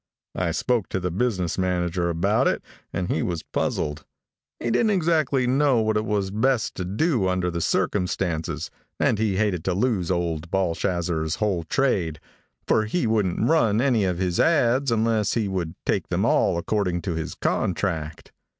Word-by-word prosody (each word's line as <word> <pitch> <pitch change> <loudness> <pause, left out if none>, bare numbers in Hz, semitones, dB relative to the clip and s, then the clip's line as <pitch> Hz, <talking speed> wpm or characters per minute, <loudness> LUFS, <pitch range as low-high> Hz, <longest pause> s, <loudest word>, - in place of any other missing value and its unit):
I - - -1
spoke 120 -5 0
to 95 - -1
the 90 -1 -2
business 95 -4 -1
manager 90 -1 0
about 85 0 +2
it, - - 0 0.3
and 90 0 -2
he 80 - 0
was 85 -3 -2
puzzled. 75 0 -2 0.6
He 120 - -1
didn't 215 - +3
exactly 155 -9 +2
know 135 0 +3
what 110 0 +1
it 105 +1 0
was 100 -3 -1
best 115 +2 +1
to 90 - -3
do 110 - +1
under 90 -1 0
the 85 0 -3
circumstances, 90 -3 -1 0.3
and 105 - +2
he 110 -3 +1
hated 100 -6 0
to 95 - 0
lose 100 -5 0
old 85 -2 -1
Balshazzer's 85 -3 -1
whole 90 -3 -1
trade, 90 - 0 0.5
for 110 - +2
he 120 +9 -1
wouldn't 110 -1 +1
run 115 -9 +3
any 125 -5 +2
of 90 -2 -1
his 90 -1 -1
ads 135 -4 +3
unless 110 -2 +1
he 110 -3 0
would 90 -4 -3
take - - 0
them - - 0
all - - +2
according 90 -1 -1
to 90 - -2
his 80 -1 -4
contract. 80 -3 -2
95 Hz, 170 wpm, -24 LUFS, 85-115 Hz, 0.6 s, didn't